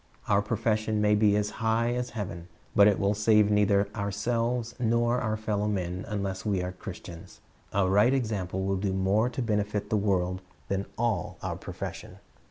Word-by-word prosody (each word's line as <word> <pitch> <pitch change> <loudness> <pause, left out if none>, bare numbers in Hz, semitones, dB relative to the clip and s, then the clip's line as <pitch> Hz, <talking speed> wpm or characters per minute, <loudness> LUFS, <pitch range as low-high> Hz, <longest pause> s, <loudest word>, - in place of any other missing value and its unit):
Our 100 0 +3
profession 110 0 0
may 105 0 +3
be 105 -1 +4
as 105 0 0
high 115 +1 +2
as 125 0 -2
heaven, 90 -4 -5 0.3
but 100 0 +7
it 105 - +4
will 100 +1 +2
save 105 0 +4
neither 100 -1 +3
ourselves 115 +3 -1
nor 120 +1 +2
our 110 -2 -1
fellow 105 -1 -1
men 90 -3 -2
unless 100 -3 -3
we 100 -4 0
are 90 - -3
Christians. 85 -2 -10 0.3
A 100 -1 +2
right 105 +6 +4
example 100 -8 -1
will 95 0 0
do 95 0 -1
more 100 +5 +2
to 130 0 -3
benefit 105 -2 -1
the 110 - +3
world 95 -2 0 0.3
than 100 0 -1
all 120 -2 -1
our - - -2
profession. - - -7
105 Hz, 175 wpm, -28 LUFS, 100-110 Hz, 0.3 s, but